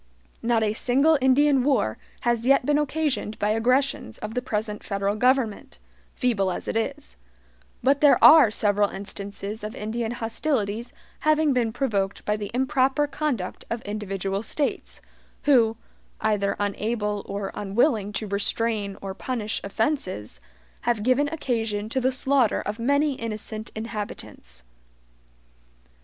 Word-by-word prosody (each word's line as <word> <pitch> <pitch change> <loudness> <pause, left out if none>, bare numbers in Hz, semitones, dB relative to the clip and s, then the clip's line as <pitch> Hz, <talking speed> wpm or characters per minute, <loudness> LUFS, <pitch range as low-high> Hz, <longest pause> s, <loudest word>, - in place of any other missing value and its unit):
Not 230 -1 +2
a 210 -1 +1
single 275 +8 +3
Indian 270 +1 +4
war 260 - +1 0.2
has 240 0 0
yet 275 -2 +4
been 295 +1 +3
occasioned 295 -7 -1
by 205 - 0
aggressions 245 - +1
of 215 +1 -6
the 250 - -1
present 210 -2 -3
federal 200 0 -1
government, 250 -2 +1 0.4
feeble 210 -7 +1
as 180 - -4
it - - -2
is; 70 - -3 0.7
but 275 +2 +3
there 295 -2 +7
are 310 -7 +9
several 205 -1 +2
instances 200 +2 -6
of 215 +3 -5
Indian 225 +1 -3
hostilities 230 -1 -2 0.3
having 310 -1 +3
been 240 -3 +1
provoked 215 -6 -1
by 210 - +1
the 205 -2 -5
improper 265 +2 +2
conduct 290 -10 -3
of 230 0 -3
individual 195 -1 -3
States, 285 +5 -3 0.4
who, 230 -6 +4 0.4
either 205 -2 +1
unable 210 0 -1
or 200 0 -4
unwilling 210 +1 +1
to 215 - -3
restrain 205 0 -1
or 195 -1 -4
punish 220 0 -3
offenses, 200 - -2 0.4
have 235 -3 0
given 255 +4 +3
occasion 225 -8 -2
to 260 +3 -1
the 260 +1 +2
slaughter 265 -3 +2
of 210 +2 -4
many 285 +4 +2
innocent 220 -2 -5
inhabitants. 210 - -7
225 Hz, 135 wpm, -25 LUFS, 205-260 Hz, 0.7 s, are